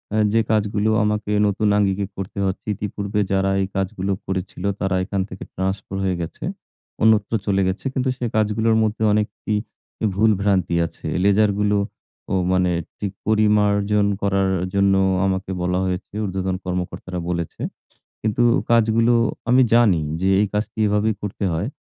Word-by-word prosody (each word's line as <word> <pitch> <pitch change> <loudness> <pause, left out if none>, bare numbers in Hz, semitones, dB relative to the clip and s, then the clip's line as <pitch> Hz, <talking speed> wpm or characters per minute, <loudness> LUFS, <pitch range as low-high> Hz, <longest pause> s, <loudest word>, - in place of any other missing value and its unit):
আ - - +2 0.2
যে 115 - +4
কাজগুলো 105 0 +1
আমাকে 105 0 -1 0.2
নতুন 105 +1 0
আঙ্গিকে 100 -1 +1
করতে 95 +1 -6
হচ্ছে 95 - -3
ইতিপূর্বে 100 +1 -3
যারা 95 0 +2
এই 95 - 0
কাজগুলো 95 0 -2
করেছিল 95 0 -4 0.2
তারা 95 -1 0
এখান 100 0 -2
থেকে 95 - -8
ট্রান্সফার 95 +1 -3
হয়ে 95 -2 +1
গেছে। 80 - -7 0.6
অন্যত্র 110 -1 +4
চলে 100 -1 +2
গেছে 95 +8 -3
কিন্তু 130 -1 0
সেই 120 -2 -2
কাজগুলোর 110 +1 +2
মধ্যে 110 0 -1
অনেক 105 0 +2 0.3
ই - - +3 0.6
ভুল 110 +2 +4
ভ্রান্তি 95 -4 +1
আছে, - - -8 0.2
লেজারগুলোও 105 0 +3 0.7
মানে 90 -1 +2 0.3
ঠিক 100 -2 -2 0.2
পরিমার্জন 105 -1 +3 0.2
করার 100 -1 +1 0.2
জন্য 100 0 +3 0.3
আমাকে 95 0 -1
বলা 90 +1 0
হয়েছে 90 +2 -4
ঊর্ধ্বতন 95 -1 -2
কর্মকর্তারা 90 0 -4
বলেছে। 85 -2 -3 0.6
কিন্তু 110 +2 +1 0.3
কাজগুলো 115 +1 +4 0.4
আমি 130 +1 +6
জানি 105 -8 +5 0.2
যে 95 - +1
এই 105 - +3
কাজটি 105 +1 -3
এভাবেই 105 +1 +1
করতে 105 0 -4
হয়। 85 +9 -1
100 Hz, 145 wpm, -21 LUFS, 95-105 Hz, 0.7 s, আমি